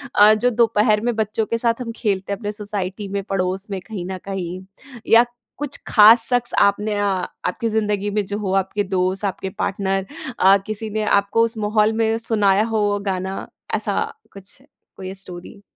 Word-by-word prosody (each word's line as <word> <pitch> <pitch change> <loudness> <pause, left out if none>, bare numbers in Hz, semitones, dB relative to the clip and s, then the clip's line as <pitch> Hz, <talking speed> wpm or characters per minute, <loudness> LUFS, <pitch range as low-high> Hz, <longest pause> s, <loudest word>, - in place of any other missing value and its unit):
अ, 210 +1 +7
जो 220 +3 +2
दोपहर 215 -1 +3
में 240 - 0
बच्चों 220 0 -1
के 230 - -2
साथ 230 +1 0
हम 235 -2 -4
खेलते 200 -4 -2
हैं - - -4
अपने 205 -2 -3
सोसाइटी 205 -1 -4
में 200 - 0
पड़ोस 190 +1 -1
में 195 - -2
कहीं 205 -6 -5
न 190 - -4
कहीं 185 -2 -5 0.5
या 230 +1 +7 0.3
कुछ 290 -1 -4
ख़ास 225 +1 +7
शख्स 245 -1 +1
आपने 210 +1 +2
अ, 205 - 0 0.4
आपकी 230 +5 -1
ज़िन्दगी 210 -2 0
में 210 0 -1
जो 200 +2 -4
हो 195 -3 -2
आपके 205 +2 -3
दोस्त 190 +1 -1
आपके 190 0 -3
पार्टनर 195 -1 -1 0.3
अ, 195 +1 +6
किसी 215 +1 -4
ने 215 +1 -2 0.2
आपको 200 +3 +1
उस 230 0 -1
माहौल 215 +1 +2
में 225 0 +1
सुनाया 205 -2 +3
हो 205 -1 +1
गाना 190 +1 -3 0.3
ऐसा - - -1 0.3
कुछ 195 0 -14 0.4
कोई 190 0 -6
स्टोरी? 190 0 -10
205 Hz, 180 wpm, -21 LUFS, 195-220 Hz, 0.5 s, अ